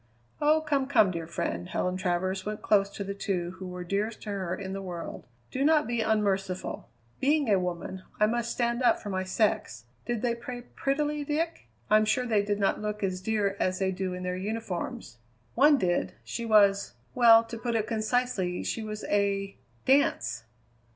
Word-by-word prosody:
"Oh, 305 Hz, +1 st, +4 dB
come, 285 Hz, -4 st, 0 dB
come, 220 Hz, -8 st, +4 dB
dear 165 Hz, -2 st, -5 dB
friend!" 90 Hz, -, -3 dB
Helen 180 Hz, 0 st, -1 dB
Travers 185 Hz, +1 st, -1 dB
went 210 Hz, +1 st, -5 dB
close 200 Hz, -2 st, +3 dB
to 200 Hz, -, -6 dB
the 200 Hz, 0 st, -4 dB
two 185 Hz, -3 st, -2 dB
who 190 Hz, -, -6 dB
were 180 Hz, 0 st, -6 dB
dearest 205 Hz, +5 st, -2 dB
to 210 Hz, -, -4 dB
her 185 Hz, -3 st, -2 dB
in 190 Hz, 0 st, -6 dB
the 195 Hz, -, -4 dB
world. 175 Hz, -, -7 dB, 0.2 s
"Do 265 Hz, -, -1 dB
not 305 Hz, 0 st, +4 dB
be 235 Hz, -1 st, -1 dB
unmerciful. 195 Hz, -4 st, -1 dB, 0.3 s
Being 290 Hz, 0 st, +2 dB
a 195 Hz, -, +4 dB
woman, 180 Hz, +1 st, -4 dB, 0.2 s
I 210 Hz, -, +6 dB
must 235 Hz, +2 st, 0 dB
stand 235 Hz, 0 st, 0 dB
up 240 Hz, -2 st, +4 dB
for 205 Hz, -, -6 dB
my 185 Hz, 0 st, -1 dB
sex. 210 Hz, -, 0 dB, 0.2 s
Did 240 Hz, -2 st, -2 dB
they 240 Hz, -1 st, +2 dB
play 245 Hz, +1 st, -7 dB
prettily, 295 Hz, +2 st, 0 dB
Dick? 310 Hz, -, -2 dB, 0.2 s
I'm 215 Hz, 0 st, +5 dB
sure 235 Hz, +4 st, +1 dB
they 220 Hz, -4 st, +2 dB
did 205 Hz, 0 st, -1 dB
not 200 Hz, -, +1 dB
look 210 Hz, 0 st, -3 dB
as 185 Hz, -1 st, -1 dB
dear 205 Hz, -1 st, 0 dB
as 185 Hz, 0 st, +1 dB
they 190 Hz, 0 st, 0 dB
do 185 Hz, -1 st, -3 dB
in 180 Hz, -, -6 dB
their 180 Hz, 0 st, -2 dB
uniforms." 185 Hz, -, -4 dB, 0.3 s
"One 290 Hz, +3 st, +6 dB
did. 175 Hz, -7 st, 0 dB
She 235 Hz, -, -4 dB
was 200 Hz, -2 st, +4 dB, 0.2 s
well, 230 Hz, -3 st, +7 dB
to 230 Hz, 0 st, -8 dB
put 235 Hz, 0 st, -2 dB
it 220 Hz, -2 st, +1 dB
concisely, 220 Hz, -5 st, 0 dB
she 225 Hz, -, -2 dB
was 215 Hz, -1 st, -5 dB
a 200 Hz, -1 st, 0 dB, 0.3 s
dance!" 255 Hz, -, +2 dB
210 Hz, 190 wpm, -28 LUFS, 185-235 Hz, 0.3 s, well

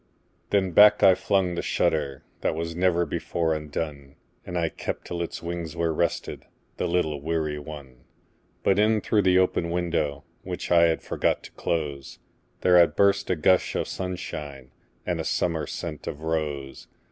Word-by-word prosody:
Then 95 Hz, -2 st, +2 dB
back 105 Hz, +4 st, +7 dB
I 95 Hz, -, +8 dB
flung 95 Hz, -1 st, +1 dB
the 85 Hz, -, -2 dB
shutterThat 70 Hz, 0 st, -1 dB
was 85 Hz, 0 st, -4 dB
never 85 Hz, -1 st, +2 dB
before 80 Hz, -1 st, -1 dB
undone, 75 Hz, -2 st, -5 dB, 0.3 s
And 90 Hz, -1 st, -3 dB
I 85 Hz, -1 st, +1 dB
kept -, -, -5 dB
till 85 Hz, -, -4 dB
its 85 Hz, 0 st, -5 dB
wings 85 Hz, -1 st, -4 dB
were 85 Hz, -1 st, 0 dB
restedThe 85 Hz, +2 st, -1 dB, 0.5 s
little 80 Hz, -5 st, 0 dB
weary 75 Hz, -1 st, -1 dB
one. 70 Hz, -4 st, -11 dB, 0.6 s
But 100 Hz, +1 st, +3 dB
in 110 Hz, 0 st, +3 dB
through 105 Hz, +1 st, +2 dB
the 95 Hz, -1 st, +4 dB
open 90 Hz, -2 st, +2 dB
window, 85 Hz, -5 st, -1 dB, 0.2 s
Which -, -, -5 dB
I 85 Hz, -1 st, +6 dB
had 80 Hz, -, -1 dB
forgot -, -, 0 dB
to -, -, -11 dB
close, 75 Hz, -5 st, -3 dB, 0.4 s
There 90 Hz, -1 st, +6 dB
had 85 Hz, -, +4 dB
burst 100 Hz, 0 st, +3 dB
a 90 Hz, -, +2 dB
gush 90 Hz, +3 st, +2 dB
of -, -, 0 dB
sunshineAnd 75 Hz, -8 st, -6 dB, 0.5 s
a -, -, -1 dB
summer 80 Hz, -4 st, -1 dB
scent -, -, -6 dB
of 75 Hz, -, -5 dB
rose. 75 Hz, -4 st, -3 dB
85 Hz, 160 wpm, -26 LUFS, 75-90 Hz, 0.6 s, I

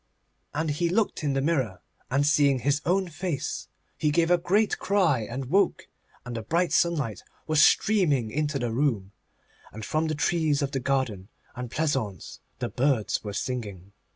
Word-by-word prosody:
And 160 Hz, 0 st, 0 dB
he 170 Hz, +4 st, 0 dB
looked 200 Hz, -2 st, 0 dB
in 145 Hz, -2 st, +1 dB
the 135 Hz, 0 st, 0 dB
mirror, 130 Hz, -, 0 dB, 0.3 s
and, 140 Hz, +3 st, +2 dB
seeing 145 Hz, -2 st, +4 dB
his 145 Hz, +3 st, +1 dB
own 190 Hz, +2 st, +2 dB
face, 160 Hz, -3 st, -4 dB, 0.3 s
he 155 Hz, -, 0 dB
gave 165 Hz, +3 st, +2 dB
a 175 Hz, -, +5 dB
great 200 Hz, +5 st, +1 dB
cry 185 Hz, -10 st, +2 dB
and 130 Hz, +3 st, -4 dB
woke, 190 Hz, +8 st, +1 dB, 0.4 s
and 125 Hz, -1 st, -6 dB
the 115 Hz, -, -3 dB
bright 170 Hz, +10 st, 0 dB
sunlight 150 Hz, -11 st, +1 dB, 0.2 s
was 155 Hz, -1 st, +4 dB
streaming 150 Hz, -, +3 dB
into 150 Hz, +2 st, -1 dB
the 120 Hz, -3 st, -2 dB
room, 115 Hz, -7 st, 0 dB, 0.6 s
and 110 Hz, 0 st, -7 dB
from 155 Hz, +1 st, 0 dB
the 155 Hz, -, -1 dB
trees 150 Hz, -1 st, +1 dB
of 140 Hz, -, -2 dB
the 135 Hz, -, -1 dB
garden 120 Hz, -8 st, -1 dB, 0.3 s
and 125 Hz, -1 st, -5 dB
pleasaunce 125 Hz, -, -2 dB, 0.2 s
the -, -, -3 dB
birds 130 Hz, -5 st, 0 dB
were 105 Hz, -, -4 dB
singing. 100 Hz, -6 st, -4 dB
145 Hz, 170 wpm, -26 LUFS, 125-165 Hz, 0.6 s, a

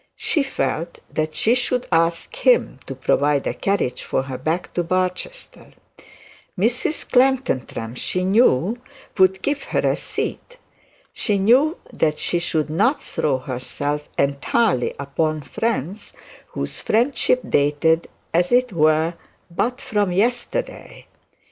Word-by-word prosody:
She 310 Hz, -, +1 dB
felt 165 Hz, -, -2 dB, 0.2 s
that 155 Hz, 0 st, -2 dB
she 225 Hz, -, +3 dB
should 250 Hz, 0 st, +1 dB
ask 165 Hz, -, +1 dB
him -, -, +2 dB
to -, -, -5 dB
provide 145 Hz, -1 st, +1 dB
a -, -, -1 dB
carriage 195 Hz, -10 st, -1 dB
for -, -, -1 dB
her 130 Hz, -1 st, -6 dB
back 160 Hz, +6 st, -2 dB
to 175 Hz, -, 0 dB
Barchester. 185 Hz, -, -3 dB, 0.8 s
Mrs 240 Hz, -, 0 dB
Clantantram 250 Hz, -, +1 dB
she 180 Hz, +8 st, -2 dB
knew 200 Hz, -, +3 dB, 0.4 s
would 190 Hz, 0 st, +4 dB
give 285 Hz, -1 st, 0 dB
her -, -, 0 dB
a -, -, +2 dB
seat. -, -, -5 dB, 0.6 s
She 210 Hz, -3 st, +1 dB
knew 255 Hz, -, +4 dB, 0.2 s
that 155 Hz, -1 st, +1 dB
she 175 Hz, -, 0 dB
should 160 Hz, -3 st, 0 dB
not 230 Hz, -, +2 dB
throw 140 Hz, -4 st, 0 dB
herself 140 Hz, +3 st, -4 dB
entirely 140 Hz, -, +1 dB
upon 150 Hz, +2 st, -2 dB
friends 205 Hz, -, -3 dB, 0.3 s
whose 70 Hz, -1 st, -4 dB
friendship 250 Hz, -, +2 dB
dated 150 Hz, +3 st, +2 dB, 0.2 s
as 175 Hz, +1 st, +2 dB
it 250 Hz, -2 st, +3 dB
were 155 Hz, +1 st, +3 dB, 0.4 s
but 245 Hz, +8 st, -1 dB
from 205 Hz, -3 st, 0 dB
yesterday. 240 Hz, -, -2 dB
180 Hz, 125 wpm, -21 LUFS, 150-235 Hz, 0.8 s, would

